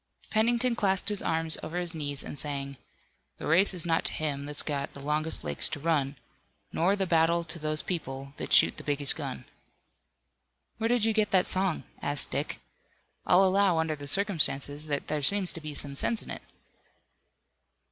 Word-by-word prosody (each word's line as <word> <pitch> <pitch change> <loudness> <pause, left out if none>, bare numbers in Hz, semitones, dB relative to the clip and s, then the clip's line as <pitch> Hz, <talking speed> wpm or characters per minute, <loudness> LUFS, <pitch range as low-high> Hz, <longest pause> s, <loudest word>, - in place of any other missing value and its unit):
Pennington 235 +2 +2
clasped 195 -3 +1
his 205 -1 -2
arms 160 0 +2
over 170 - -6
his 175 -1 +2
knees 145 -3 -1
and 145 - -8
sang: 140 -1 -4 0.6
"The - - -8
race 175 +6 +4
is 180 -3 -1
not 165 -1 +1
to - - 0
him 145 -2 -3
that's 145 0 +2
got 140 -2 -3
The - - -6
longest 150 +3 -2
legs 75 - +2
to 150 - -5
run, 145 -3 0 0.6
Nor 185 +5 +2
the 195 -1 -1
battle 170 0 +2
to 170 +1 -9
those 155 0 -2
people 140 -6 -5
That - - -6
shoot - - +4
the - - -8
biggest 145 -1 +2
gun." - - -6 1.3
"Where 225 - 0
did 240 -2 +2
you 225 - +1
get 215 -1 +1
that 185 -2 +3
song?" 190 -3 0 0.2
asked 145 0 -1
Dick. 140 +3 -3 0.7
"I'll 190 +2 +5
allow, 190 -2 +3
under 160 -1 0
the 145 -1 -9
circumstances, 150 -5 +3
that 145 -1 -2
there 150 -1 -2
seems 190 +5 +2
to 165 - -7
be 150 -1 -7
some 140 -1 -5
sense 220 +10 -2
in - - -9
it." - - -7
160 Hz, 185 wpm, -28 LUFS, 145-190 Hz, 1.3 s, I'll